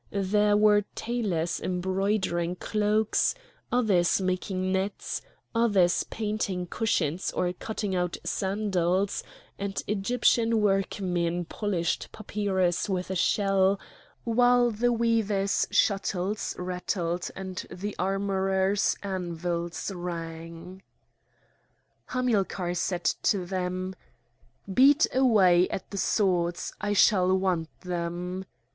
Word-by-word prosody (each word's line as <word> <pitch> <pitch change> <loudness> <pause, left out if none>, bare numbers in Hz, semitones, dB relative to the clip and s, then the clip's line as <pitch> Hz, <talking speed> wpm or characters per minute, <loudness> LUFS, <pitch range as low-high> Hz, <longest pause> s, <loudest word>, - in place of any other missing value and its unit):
There 205 +1 +2
were 210 0 +5
tailors 195 -9 -1
embroidering 185 -1 -1
cloaks, 215 - +1 0.4
others 200 -9 +3
making 185 0 -1
nets, 190 +1 -2 0.3
others 205 -7 +3
painting 210 -4 -2
cushions 180 -4 -1
or 180 0 0
cutting 205 0 -4
out 180 -1 -1
sandals, 190 -1 0 0.4
and 200 0 -3
Egyptian 225 +2 +2
workmen 180 -4 0
polished 180 -2 -2
papyrus 195 -4 -1
with 185 -1 -2
a - - -2
shell, 195 +1 +2 0.4
while 245 +1 +4
the 240 +3 +1
weavers' 225 -4 +1
shuttles 195 0 0
rattled 180 -1 -2
and 190 -1 -6
the 205 +3 -5
armourers' 195 0 +1
anvils 175 -2 -3
rang. 170 +1 -7 1.3
Hamilcar 200 -8 0
said 175 0 -2 0.2
to 190 -4 +1
them: 185 0 -3 0.8
"Beat 280 +7 +6
away 195 -9 +5
at 190 - -5
the 200 - -3
swords! 175 -5 0
I 205 0 0
shall 190 -2 +4
want 180 -4 0
them." 180 +1 -4
190 Hz, 95 wpm, -27 LUFS, 180-210 Hz, 1.3 s, Beat